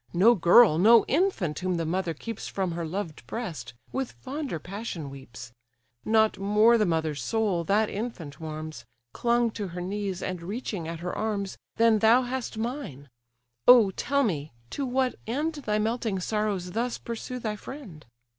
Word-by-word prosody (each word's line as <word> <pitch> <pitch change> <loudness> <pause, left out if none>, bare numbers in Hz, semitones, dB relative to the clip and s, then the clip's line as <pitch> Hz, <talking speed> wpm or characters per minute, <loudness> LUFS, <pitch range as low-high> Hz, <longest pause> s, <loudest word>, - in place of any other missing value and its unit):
No 210 +7 +6
girl, 175 -2 +6
no 225 +4 +7
infant 275 - 0
whom 185 -1 -1
the 165 - -1
mother 170 0 -1
keeps 230 +7 -6
From 190 -3 -2
her 170 -1 -3
loved 170 -3 -5
breast, 185 - -5 0.2
with 265 -1 -3
fonder 275 - -5
passion 180 -4 -6
weeps; 120 -4 -10 0.5
Not 220 0 +3
more 210 +4 +4
the 210 - +3
mother's 160 -4 -1
soul, 200 - 0
that 210 +5 +3
infant 195 -11 -6
warms, 155 -4 -6 0.3
Clung 235 -1 +2
to 210 -2 -4
her 175 0 -7
knees, 195 0 -3
and 185 -2 -3
reaching 200 -2 -4
at 165 0 -6
her 180 0 -3
arms, 205 -3 -2 0.2
Than 225 -1 +4
thou 230 +4 +5
hast 250 -2 -4
mine! 220 - -5 0.6
Oh 235 -6 +8
tell 280 +8 0
me, 155 - -2 0.2
to 275 -2 -2
what 255 0 +1
end 295 +8 -1
Thy 235 -8 -2
melting 220 -2 -1
sorrows 200 -2 -1
thus 235 +4 -1
pursue 235 +2 -6
thy 220 -3 -3
friend? 210 - -10
210 Hz, 165 wpm, -27 LUFS, 170-235 Hz, 0.6 s, Oh